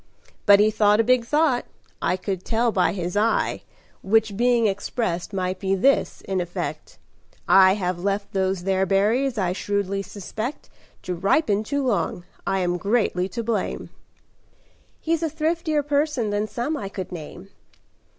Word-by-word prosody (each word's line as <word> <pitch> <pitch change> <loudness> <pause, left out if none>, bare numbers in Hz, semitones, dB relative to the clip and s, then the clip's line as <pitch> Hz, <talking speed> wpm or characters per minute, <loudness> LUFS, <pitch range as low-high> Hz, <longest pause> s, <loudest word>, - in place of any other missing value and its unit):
But 200 0 +8
he 215 +1 +4
thought 210 0 +3
a - - +5
big 250 0 +3
thought 295 -2 +2 0.4
I 185 - +1
could 190 -1 -4
tell 235 +1 +1
by 185 -4 +2
his 180 -1 -4
eye 220 +2 +1 0.4
Which 220 0 +2
being 240 +1 +3
expressed, 195 -3 -2
might 185 -1 -2
be 195 0 0
this 270 +9 +2
in 190 -1 -2
effect: 175 -1 -5 0.5
'I 190 0 +6
have 180 -3 -2
left 200 +1 -2
those 190 -2 0
there 190 0 +1
berries, 225 +7 +2
I 185 -3 0
shrewdly 200 0 -2
suspect, 215 +6 -6 0.3
To 180 - -3
ripen 200 - +1
too 280 +4 -2
long. 200 -6 -1 0.2
I 195 0 +1
am 175 0 0
greatly 200 -2 0
to 235 +2 -4
blame.'" 220 -3 -2 1.1
"He's 330 0 -1
a 325 - 0
thriftier 315 -1 0
person 285 -6 0
than 205 +1 -1
some 245 +8 -2
I 200 -9 -5
could 190 -2 -6
name." 175 +3 -9
205 Hz, 155 wpm, -23 LUFS, 190-240 Hz, 1.1 s, But